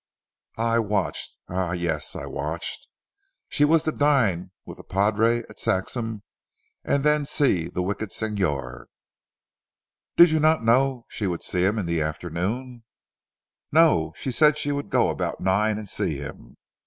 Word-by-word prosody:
I 115 +1 +2
watched 105 -4 -2
eh! 90 -1 -1
yes, 85 -4 -2
I - - -5
watched. 75 +4 -4 0.6
She 145 - +2
was 155 +1 +4
to 155 - 0
dine 115 - +2 0.2
with - - -10
the - - -12
padre 110 +4 +1
at - - -14
Saxham, 110 +3 -2 0.6
and 140 - 0
then 150 0 +3
see 135 - +1
the 90 - -3
wicked 100 +2 -3
Signor." 90 - -2 1.3
"Did 170 -1 +8
you 160 - +2
not 155 -3 +3
know 125 +1 +2
she 105 - -3
would 85 -2 -3
see 90 -1 0
him 105 +3 +1
in 100 - -1
the 85 -1 0
afternoon?" 95 +11 -3 0.9
"No! 145 - +4
She 130 - -4
said 150 +3 +4
she 145 - -1
would 145 0 -3
go - - +3
about - - -3
nine 105 +3 +1
and 105 -1 -7
see - - -2
him. - - -10
110 Hz, 155 wpm, -24 LUFS, 90-135 Hz, 1.3 s, Did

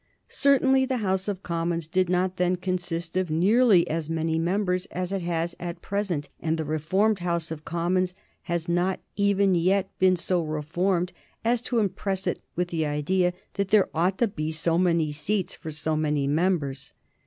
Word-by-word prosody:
Certainly 265 -1 +3
the 260 -1 0
House 190 0 0
of 200 -2 -3
Commons 170 -1 -2
did 185 +2 +1
not 180 +1 +1
then 180 0 +2
consist 175 -2 -3
of 185 -2 0
nearly 195 +4 +4
as 160 0 -2
many 160 0 0
members 180 +1 0
as 180 +1 -4
it 195 -1 -1
has 170 0 -2
at 175 -1 -6
present, 195 -7 -2
and 160 0 -1
the 160 - -2
reformed 185 +8 +1
House 170 -2 -1
of 155 -1 -6
Commons 180 +2 0 0.3
has 170 -1 -1
not 175 +2 +1 0.2
even 200 -1 +3
yet 185 +3 +2
been 185 0 +5
so 180 0 0
reformed 170 +4 -1 0.3
as 235 0 +2
to 245 -1 -2
impress 195 -2 -1
it 180 - -1
with 180 0 -1
the 165 -2 -1
idea 155 +5 +1 0.2
that 200 -1 -1
there 205 -1 +4
ought 180 +4 +1
to 235 - +3
be 155 -6 -3
so 165 +1 +1
many 170 -4 +2
seats 185 +6 -1
for 160 - -8
so 155 +1 -2
many 150 -2 0
members. 145 -3 0
180 Hz, 175 wpm, -26 LUFS, 165-190 Hz, 0.3 s, been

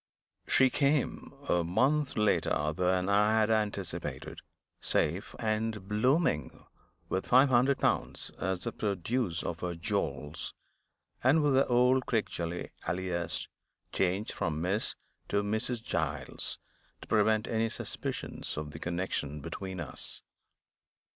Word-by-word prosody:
She 130 -1 +5
came, 140 0 +1 0.2
a 85 - +3
month 135 - +2
later 80 -7 +2
than 90 +1 +2
I 105 +2 +4
had 110 0 +3
anticipated; 105 -5 -2 0.4
safe 85 +6 0
and 110 -2 -1
blooming, 110 - +1 0.4
with 95 - -2
five 130 +3 +6
hundred 130 +2 +4
pounds - - 0
as 95 0 -1
the 115 - -2
produce 100 -2 -1
of 85 - -3
her 90 -1 -3
jewels, 75 -2 -2 0.7
and 145 +5 +5
with 145 -2 +3
the 135 +1 +4
old 125 +1 +4
Crickgelly 90 -6 -2 0.2
alias 90 -1 -1 0.4
(changed 95 +3 0
from 80 -2 -2
Miss 95 +6 0 0.3
to 100 0 +1
Mrs. 110 +3 0
Giles), 75 - -2 0.4
to - - -11
prevent 110 0 +3
any 115 0 +1
suspicions 110 - -4
of 75 -1 -4
the 80 - -8
connection 85 -4 -2
between 95 +5 -6
us. 75 -6 -6
100 Hz, 120 wpm, -31 LUFS, 85-120 Hz, 0.7 s, five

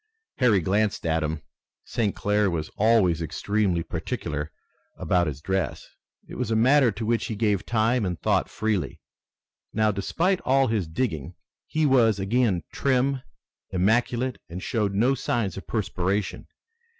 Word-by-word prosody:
Harry 115 -7 +4
glanced 100 +4 0
at 80 0 +1
him. 75 0 -3 0.4
St. 115 -5 -1
Clair 105 0 +1
was 80 -3 -3
always 100 -7 +3
extremely 90 +2 0
particular 75 -1 -4 0.5
about 90 -2 +1
his 75 -1 -5
dress. 95 -5 -2 0.4
It - - -9
was 125 -4 -1
a 110 - +1
matter 130 +2 +5
to 110 +2 -5
which 115 +1 +1
he 110 - -3
gave 105 -2 0
time 115 +1 +2
and 90 -3 -2
thought - - +1
freely. 110 -3 -2 0.7
Now, 110 0 +2
despite 170 - 0
all 135 +1 +3
his 110 -7 -1
digging, 80 - -3 0.3
he 155 0 0
was 120 -7 +4
again 100 -2 +1
trim, 135 0 +1 0.5
immaculate, 120 +6 +1
and 90 +2 -7
showed 105 -4 -1
no 120 +7 +3
signs 120 -7 -1
of 95 - -8
perspiration. 100 -2 -2
105 Hz, 145 wpm, -25 LUFS, 90-120 Hz, 0.7 s, matter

